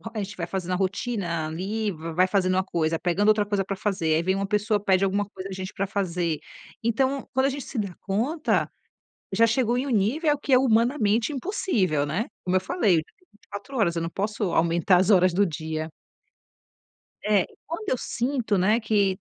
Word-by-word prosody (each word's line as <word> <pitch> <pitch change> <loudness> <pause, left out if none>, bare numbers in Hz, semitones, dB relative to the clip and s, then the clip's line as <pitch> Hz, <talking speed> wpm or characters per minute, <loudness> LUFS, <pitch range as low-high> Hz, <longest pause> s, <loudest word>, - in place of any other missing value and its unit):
A 215 - -1
gente 200 +1 -8
vai 170 -2 -4
fazendo 185 -1 -4
a - - +2
rotina 190 -4 -2
ali, 200 +7 -2
va 165 -1 -7
vai 180 +2 +4
fazendo 185 -2 +1
uma 190 0 +2
coisa, 165 -3 -1
pegando 180 +5 0
outra 215 -1 +4
coisa 200 -1 0
pra 195 +1 -4
fazer 190 -5 0
aí 160 - +1
vem 190 +2 +1
uma 195 0 -2
pessoa, 210 +1 +1
pede 190 -1 +3
alguma 200 +1 +1
coisa 195 -1 -8
a - - -8
gente 185 0 -5
pra 195 - -1
fazer. 180 -5 -1 0.4
Então, 260 +4 0
quando 265 +1 +3
a - - +3
gente 280 -1 -5
se 250 - -7
dá 200 -4 -2
conta, 250 - 0 0.6
já 230 - +4
chegou 235 +1 +1
em 265 - -1
um - - -4
nível 275 - +2
que 285 - -4
é 255 - +8
humanamente 230 -1 +2
impossível, 235 - 0
né. 180 +11 -1 0.2
Como 185 0 0
eu 185 - +3
falei, 195 - +1
o - - +5
dia 160 - +1 0.2
tem 365 - -31
24 210 +5 -9
horas, 175 -6 +2
eu 165 - -1
não 165 - -2
posso 205 +3 -2
aumentar 170 +2 +3
as 185 +4 +2
horas 185 -2 +5
do 200 +3 +3
dia. 155 -1 -4 1.3
É. 210 -3 +3 0.2
Quando 365 +6 -4
eu - - +2
sinto, 240 -4 -1
né, 210 +5 +3
que 205 -4 +1
200 Hz, 210 wpm, -25 LUFS, 180-230 Hz, 1.3 s, é